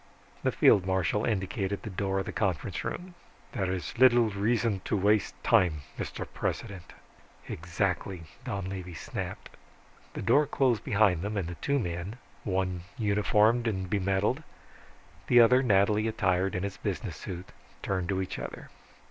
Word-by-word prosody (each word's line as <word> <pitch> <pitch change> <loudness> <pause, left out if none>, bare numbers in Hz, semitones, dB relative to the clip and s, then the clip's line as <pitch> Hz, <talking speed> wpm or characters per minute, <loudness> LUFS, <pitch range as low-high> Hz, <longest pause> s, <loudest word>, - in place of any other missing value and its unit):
The - - +1
field 95 - +5
marshal 95 +3 +1
indicated 95 -2 -1
the 110 - -5
door 95 +1 -1
of 95 - -1
the - - -4
conference 95 -8 -1
hall. 180 0 -5 0.4
"There 95 -2 -1
is 90 +4 -4
little 120 -3 +6
reason 105 0 +1
to 105 - 0
waste 105 +1 +2
time, 80 -5 +3 0.2
Mr. - - -4
President." 95 -3 -4 0.5
"Exactly," 90 +1 -2 0.2
Donlevy 95 -6 -5
snapped. - - -6 0.6
The - - -4
door 140 +5 +4
closed 125 -6 +1
behind 100 -5 +3
them 105 +2 -3
and 95 -4 -1
the 90 - -5
two 140 0 +1
men, 90 -2 -3 0.3
one 95 -3 -1 0.2
uniformed 105 +2 +3
and 95 -4 -1
bemedaled, 100 +7 +1 0.9
the 120 - +6
other 125 +2 +7
nattily 105 -2 +3
attired 95 -3 +1
in 90 - -1
his 100 -1 -4
business - - -3
suit, 90 +1 -7 0.3
turned 95 -3 -1
to 95 -1 0
each 95 - -6
other. - - -7
100 Hz, 150 wpm, -29 LUFS, 95-110 Hz, 0.9 s, other